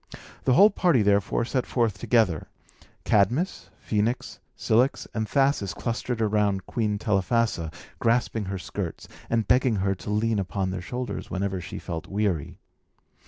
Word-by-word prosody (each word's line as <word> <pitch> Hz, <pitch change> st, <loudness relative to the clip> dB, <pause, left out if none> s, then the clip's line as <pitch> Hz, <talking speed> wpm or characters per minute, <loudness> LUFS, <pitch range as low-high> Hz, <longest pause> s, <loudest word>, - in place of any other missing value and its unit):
The 130 Hz, -, +4 dB
whole 205 Hz, +11 st, +7 dB
party, 170 Hz, -, +3 dB
therefore, 100 Hz, +3 st, +2 dB
set 125 Hz, 0 st, -1 dB
forth 115 Hz, -5 st, 0 dB
together; 110 Hz, -10 st, +2 dB, 0.6 s
Cadmus, 120 Hz, -, +1 dB, 0.2 s
Phœnix, 110 Hz, +3 st, -1 dB, 0.2 s
Cilix 125 Hz, +5 st, +2 dB
and 110 Hz, -1 st, -2 dB
Thasus 135 Hz, -, +1 dB
clustered 120 Hz, 0 st, -3 dB
round 105 Hz, -3 st, +1 dB
Queen 105 Hz, -3 st, -1 dB
Telephassa, 105 Hz, -3 st, 0 dB, 0.3 s
grasping 115 Hz, -2 st, +1 dB
her 95 Hz, 0 st, -3 dB
skirts, 90 Hz, -4 st, -5 dB, 0.2 s
and 115 Hz, -2 st, +1 dB
begging 125 Hz, -2 st, +3 dB
her 95 Hz, 0 st, +1 dB
to 95 Hz, -, -8 dB
lean 105 Hz, +1 st, +1 dB
upon 95 Hz, 0 st, -2 dB
their 95 Hz, -1 st, -4 dB
shoulders 125 Hz, +6 st, -5 dB
whenever 95 Hz, -1 st, -2 dB
she 95 Hz, -, -7 dB
felt 80 Hz, -3 st, -5 dB
weary. 100 Hz, -7 st, -1 dB
105 Hz, 140 wpm, -26 LUFS, 95-120 Hz, 0.6 s, whole